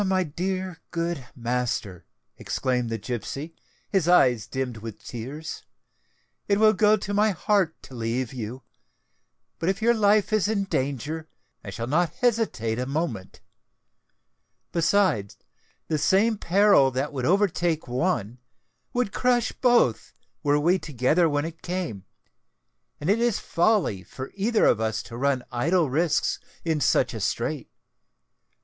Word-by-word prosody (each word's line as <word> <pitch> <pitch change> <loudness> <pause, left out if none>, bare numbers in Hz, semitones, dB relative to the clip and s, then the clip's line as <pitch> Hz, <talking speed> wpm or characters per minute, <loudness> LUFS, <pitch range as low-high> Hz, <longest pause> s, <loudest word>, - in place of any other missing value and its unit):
"My 190 -1 +2
dear, 185 +2 -4
good 170 -6 -3
master," 120 - -3 0.3
exclaimed 125 -2 -1
the 115 - -2
gipsy, 125 +8 -5 0.3
his 190 -5 +1
eyes 125 - +4
dimmed 130 -3 -3
with 110 -1 -9
tears, 135 +7 -6 0.9
"it 200 0 +2
will 215 0 +6
go 210 +1 +4
to 205 0 -5
my 210 +2 +3
heart 195 -3 +1
to - - -13
leave 120 +1 -2
you; 125 +1 -6 1.0
but 165 - 0
if 195 +1 0
your 235 +2 +4
life 210 -1 +3
is 215 -2 +3
in 210 -2 0
danger, 150 - -3 0.3
I - - -7
shall 105 +4 -4
not 165 +5 +1
hesitate 210 - 0
a 125 - -2
moment. 135 - -3 1.3
Besides, 165 - +1 0.5
the 155 -2 0
same 210 +6 +3
peril 195 -6 +5
that 135 +3 -3
would 130 -3 -2
overtake 175 -4 +1
one, 125 - -1 0.5
would 245 -5 -1
crush 245 -2 +2
both, 240 - +2 0.3
were 145 0 +2
we 175 +5 +3
together 150 +4 +2
when 145 0 0
it 165 0 -8
came; 170 - -4 0.9
and 145 - -5
it 205 +4 +3
is 235 -3 +2
folly 175 - +1
for 130 +7 -8
either 215 +3 +2
of 110 - +4
us 110 -1 -1
to 115 - -10
run 130 0 0
idle 155 +4 +1
risks 160 +3 +1 0.3
in 160 -3 0
such - - +2
a - - -5
strait. - - -2
160 Hz, 140 wpm, -25 LUFS, 125-195 Hz, 1.3 s, will